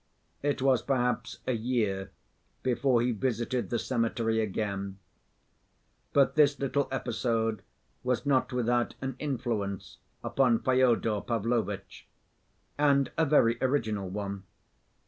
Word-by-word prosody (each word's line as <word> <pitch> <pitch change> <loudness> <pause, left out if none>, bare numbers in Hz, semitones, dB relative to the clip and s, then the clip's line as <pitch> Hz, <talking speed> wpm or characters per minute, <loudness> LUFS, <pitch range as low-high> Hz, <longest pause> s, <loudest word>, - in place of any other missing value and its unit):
It 140 -2 0
was 130 -4 +4
perhaps 125 -2 -1
a - - 0
year 110 -5 -1 0.5
before 125 -1 +2
he 125 - +1
visited 120 +2 -1
the 120 - 0
cemetery 115 -2 0
again. 100 -2 -3 1.1
But 140 -1 +4
this 145 -2 +4
little 140 +1 0
episode 115 -3 -1 0.4
was 125 0 0
not 135 -2 +2
without 120 -1 0
an 130 -1 -4
influence 115 -9 -3 0.2
upon 125 -4 +2
Fyodor 120 -5 +2
Pavlovitch—and 120 +5 -2
a 160 - +3
very 115 -5 +4
original 110 -8 0
one. 100 0 -4
120 Hz, 105 wpm, -29 LUFS, 110-130 Hz, 1.1 s, was